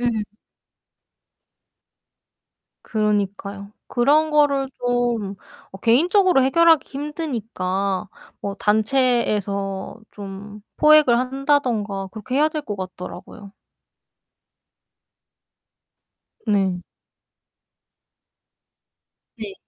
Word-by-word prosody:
음. 235 -3 0 2.6
그러니까요. 200 -1 -2 0.2
그런 295 +6 +3
거를 285 -3 +2
좀 240 -5 -1 0.4
어 195 - -10
개인적으로 340 - +4
해결하기 325 +3 +4
힘드니까 225 - -3 0.3
뭐 200 -1 -4
단체에서 210 -4 0
좀 205 +1 -9 0.2
포획을 300 -6 +6
한다든가 250 -7 0
그렇게 230 +4 -4
해야 300 +2 +4
될 310 -1 -4
것 210 -7 -5
같더라고요. 185 +2 -9 2.9
네. 190 -4 +1 2.5
네. 210 -4 -7
225 Hz, 160 characters per minute, -22 LUFS, 200-275 Hz, 2.9 s, 포획을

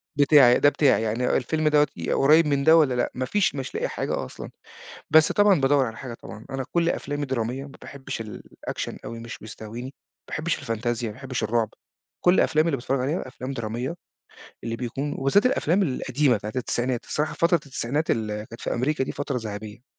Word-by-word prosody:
بتاعي، 140 -4 +6
ده 145 - +6
بتاعي، 145 -5 +3
يعني 115 +3 +1
الفيلم 155 +4 0
دوّة 150 -1 +4 0.3
قريب 155 +3 +5
من 140 -1 +1
ده 160 +3 +7
والّا 145 -6 +4
لأ؟ 125 - 0
مافيش، 145 +7 0
مش 135 -2 -5
لاقي - - 0
حاجة - - -3
أصلًا. - - -9 0.6
بس 160 0 +6
طبعًا 205 -6 +4
بادوّر 135 0 +4
على 110 - -6
حاجة 120 -1 -7
طبعًا. 110 -1 -11
أنا 135 -1 -3
كل 170 -1 +2
أفلامي 145 -3 -2
درامية، 130 +1 -2
ما 140 - -11
باحبش 135 -4 -6
الaction 105 - -7
أوي، 115 - -6
مش 115 -1 -8
بيستهويني، 110 +3 -8
ما 135 - -8 0.4
باحبش 155 +2 -2
الفانتازيا، 120 -2 -2
ما 105 - -7
باحبش 130 -1 -4
الرعب. 110 0 +1 0.5
كل 180 +1 +4
أفلامي 155 +1 +3
اللي 140 - +1
باتفرج 130 +1 -1
عليها 135 +2 -2
أفلام 130 +1 -6
درامية، 120 +4 -3 0.7
اللي 115 0 -3
بيكون 135 +4 -3
وبالذات 135 - +3
الأفلام 200 - +2
القديمة 140 -3 +1
بتاعة 105 +1 -6
التسعينات. 125 0 -1
الصراحة 150 +1 -1
فترة 170 +3 +3
التسعينات 140 +3 -1
اللي 105 -1 -2
كانت 115 - -12
في - - -2
أمريكا 130 +3 0
دي - - -4
فترة 140 -2 -3
ذهبية. 110 +1 -7
130 Hz, 185 wpm, -25 LUFS, 115-150 Hz, 0.7 s, ده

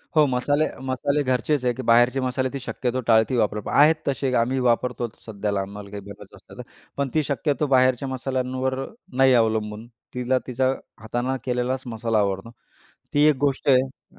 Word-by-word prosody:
हो 155 -1 +6
मसाले, 145 +4 +1 0.2
मसाले 140 +3 0
घरचेच 130 +2 0
आहे 125 - +2
की 130 - -3
बाहेरचे 120 +3 +5
मसाले 130 +1 -1
ते 140 - -3
शक्यतो 125 0 -2
टाळती 110 +2 +4
वापरत. 105 -1 0
आहेत 155 +3 +5
तसे 135 -1 0
आम्ही 130 +3 0
वापरतोच 120 -1 -1
सध्याला 100 -2 -2
आम्हाला 100 +1 -8
काही 100 - -5
गरज 100 - -13
असते - - -16
ना. - - -6 0.3
पण 140 -1 -1
ती 155 - +2
शक्यतो 145 +2 0
बाहेरच्या 130 +1 +3
मसाल्यांवर 130 0 -2 0.3
नाही 130 0 +5
अवलंबून. 110 0 -3 0.3
तिला 125 +1 0
तिचा 130 +1 +1 0.3
हातानं 120 +4 -2
केलेलाच 125 +1 -1
मसाला 115 0 0
आवडतो. 100 +2 -1 0.6
ती 145 +1 +4
एक 150 - +3
गोष्ट 140 +1 -2
आहे 130 0 0
125 Hz, 165 wpm, -24 LUFS, 115-135 Hz, 0.6 s, हो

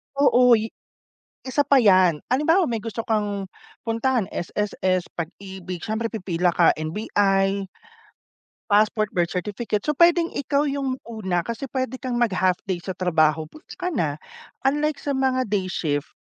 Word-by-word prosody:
Oo, 250 -3 +5
i 220 0 -2 0.7
isa 260 +3 +1
pa 280 -1 +4
'yan. 185 -8 +4
Halimbawa 320 +8 +3
may 230 -6 -2
gusto 230 0 -5
kang 205 -3 -1 0.4
puntahan, 230 0 0
SSS, 185 -1 -1
Pag-IBIG, 185 +1 -7
siyempre 225 +1 -2
pipila 180 -5 -1
ka, 170 0 +4
NBI 195 +3 0 1.0
passport, 215 0 +2
birth 175 -1 +1
certificate, 205 +3 -3
so 300 - +1
pwedeng 340 +2 +4
ikaw 285 +1 0
yung 275 -2 -2
una 190 -7 -2
kasi 235 +4 -5
pwede 260 -1 -3
kang 250 -2 -2
mag-half 185 -6 +2
day 180 -3 -3
sa 185 -1 -6
trabaho, 160 -3 +2
goods 310 - -14
ka 360 -1 -3
na. 150 - -1 0.5
Unlike 295 +2 +1
sa 285 - -2
mga 260 -1 +1
day 195 -3 -1
shift, 145 -5 -2
215 Hz, 145 wpm, -23 LUFS, 185-260 Hz, 1.0 s, Oo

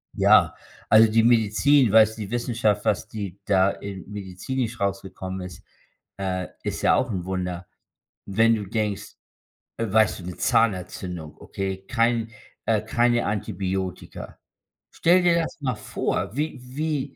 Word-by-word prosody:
Ja. - - +5 0.3
Also, 110 0 +7
die 110 +1 +3
Medizin, 120 +4 +4
weißt 110 0 +5
du, - - -6
die 100 - -9
Wissenschaft, 115 -4 0
was - - 0
die 100 -3 -6
da 95 -1 +4
in 95 -3 -8
medizinisch 110 +5 -4
rausgekommen 95 -1 -3
ist, 90 -3 -9 0.5
äh, 95 -2 -2 0.2
ist - - -3
ja - - +4
auch 125 - 0
'n 95 -4 -3
Wunder. 90 -1 -4 0.6
Wenn 115 +3 +3
du 105 -2 -4
denkst 105 0 -3 0.6
äh, 115 -3 -2
weißt 110 0 +3
du, - - -10
'ne 90 -1 -7
Zahnentzündung. 90 -6 -1
Okay, 95 0 -5
kein 115 -1 +1 0.3
äh, 110 -2 +2
keine 120 +2 +1
Antibiotika. 95 -2 -4 0.5
Stell 180 +2 +3
dir 175 -1 +4
das 160 - -7
mal 130 -4 -1
vor, 105 - -3
wie 150 -1 -2
wie 140 +2 -3
105 Hz, 145 wpm, -24 LUFS, 95-120 Hz, 0.6 s, Also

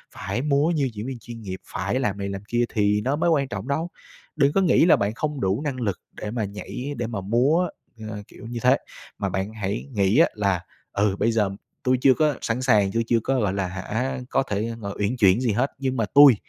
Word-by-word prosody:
phải 100 +6 -3
múa 145 +2 +2
như 140 -4 +1
diễn 105 +1 -6
viên 130 -3 -5
chuyên 115 +1 -9
nghiệp, 95 -3 -5
phải 95 +8 -2
làm 105 -6 -1
này 100 0 -3
làm 95 0 -5
kia 120 +1 +1
thì 105 0 +2
nó 135 +5 0
mới 170 +2 +1
quan 140 -4 +2
trọng 125 - -5
đâu. 160 +5 -1 0.5
Đừng 145 -1 +3
có 195 - +3
nghĩ 175 -3 +5
là 175 - +7
bạn 100 +1 -1
không 145 +3 -3
đủ 95 +6 +1
năng 145 -3 -2
lực 100 -6 -1 0.2
để 105 - -3
mà 115 -3 -1
nhảy, 125 +7 -6
để 120 -1 -2
mà 110 -4 -4
múa, 130 - +2 0.4
ờ, 105 -1 -5
kiểu - - -13
như 120 0 -4
thế. 130 +2 +5 0.4
Mà 100 -2 -1
bạn 95 +3 -3
hãy 105 +2 -3
nghĩ 100 +3 +2
á, 165 - +7
là, 100 -4 0 0.3
ừ, 100 -1 +2
bây 115 - +3
giờ 105 -3 +2 0.3
tui 130 0 +3
chưa 130 - +6
có 150 -2 +2
sẵn 115 +2 -1
sàng, 105 -6 +3
tui 115 0 +1
chưa 115 -1 +3
có, 135 -1 +1
gọi 100 -5 +1
là 100 -2 -1
hả, 110 +8 -3
có 135 - +2
thể, 110 -1 -2
ờ, 100 -1 -4
uyển 105 +5 0
chuyển 100 -1 +5
gì 120 -4 +1
hết, 125 +7 +1
nhưng 130 -2 -1
mà 115 - +1
tui 140 -4 +9
115 Hz, 245 wpm, -24 LUFS, 100-135 Hz, 0.5 s, tui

